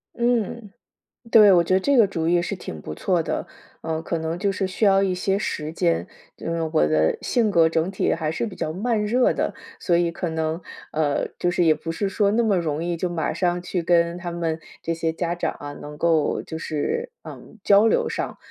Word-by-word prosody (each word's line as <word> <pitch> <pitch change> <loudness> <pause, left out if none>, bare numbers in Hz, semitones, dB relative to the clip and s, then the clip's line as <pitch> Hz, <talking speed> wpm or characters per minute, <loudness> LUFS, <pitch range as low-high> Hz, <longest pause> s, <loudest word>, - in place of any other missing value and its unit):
嗯， 235 -3 -1 0.6
对， 210 -3 +8
我 175 -2 +6
觉 185 +2 +1
得 - - +5
这 280 +8 +2
个 225 -5 +6
主 165 -4 -2
意 175 +1 +3
是 195 +2 -3
挺 80 - -8
不 75 - -6
错 175 - 0
的， - - -3 0.4
呃， 160 0 -3
可 165 0 -2
能 160 +1 -3
就 200 +3 0
是 195 0 -1
需 185 +4 -1
要 195 -1 +5
一 195 -2 +1
些 195 +2 0
时 155 -6 -3
间。 85 - 0 0.3
因 165 - -4
为 165 - -2
我 75 - +4
的 80 +1 +2
性 225 -4 +1
格 165 -2 +5
整 160 +1 0
体 190 - 0
还 155 -2 -1
是 160 - -2
比 210 -5 -6
较 155 - -3
慢 210 +4 0
热 245 +4 +3
的， - - -2 0.2
所 170 - +1
以 170 0 +2
可 170 +1 -4
能 160 +1 -2 0.3
呃， 150 -2 0
就 175 - 0
是 175 - +2
也 160 - +6
不 160 +2 -4
是 200 +4 -1
说 200 +1 +1
那 235 +2 +2
么 210 -4 +2
容 155 -2 -2
易， 170 0 -2
就 180 +2 -2
马 170 -2 -2
上 175 -1 0
去 180 0 -2
跟 170 0 +2
他 175 -1 -5
们 165 -2 -2 0.2
这 165 - -1
些 165 0 -1
家 170 +1 -2
长 - - -1
啊， 145 0 -6
能 150 0 -9
够 160 -1 +1
就 160 - -7
是， 470 - -3
嗯， 225 - -12
交 205 +2 +5
流 - - +2
上。 - - -4
175 Hz, 245 characters per minute, -23 LUFS, 160-195 Hz, 0.6 s, 对